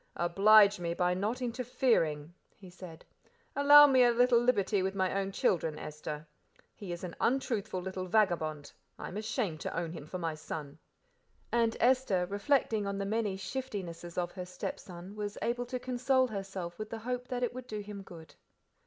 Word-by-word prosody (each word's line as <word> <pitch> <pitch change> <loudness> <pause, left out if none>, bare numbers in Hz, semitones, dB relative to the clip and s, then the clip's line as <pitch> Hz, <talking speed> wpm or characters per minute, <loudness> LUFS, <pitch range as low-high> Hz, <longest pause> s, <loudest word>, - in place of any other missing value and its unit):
"Oblige 200 +3 +5
me 170 -1 -2
by 180 0 +1
not 215 +7 -2
interfering," 230 - 0 0.2
he 185 -3 -14
said; 175 -3 -11 0.5
"allow 290 +1 +9
me 265 -3 +5
a 245 - +6
little 240 0 +4
liberty 210 -5 +2
with 190 +1 -2
my 190 -1 0
own 195 0 -1
children, 160 -5 0
Esther. 150 0 -6 0.5
He 195 -4 -8
is 175 +1 -6
an 175 -2 -6
untruthful 220 -6 0
little 185 0 -4
vagabond; 160 -8 0 0.2
I - - -6
am - - -9
ashamed 215 - -2
to - - -4
own 165 -1 -2
him 160 -3 -9
for 185 - -5
my 165 -3 -2
son." 155 -1 -7 0.7
And 230 -1 +1
Esther, 245 -7 +3
reflecting 210 +1 0
on 200 0 -2
the 200 - -2
many 210 -2 -1
shiftinesses 190 -8 -6
of 175 -1 -1
her 180 -2 -6
stepson, 180 +1 -7
was 210 -1 -5
able 245 +1 -1
to 255 +1 -3
console 255 +1 +1
herself 195 -6 -6
with 215 0 -5
the 225 - -5
hope 250 +2 -4
that 250 -1 -3
it 245 - -1
would 255 0 -8
do 215 -3 -4
him 205 -1 -8
good. 170 -4 -13
200 Hz, 180 wpm, -31 LUFS, 175-240 Hz, 0.7 s, allow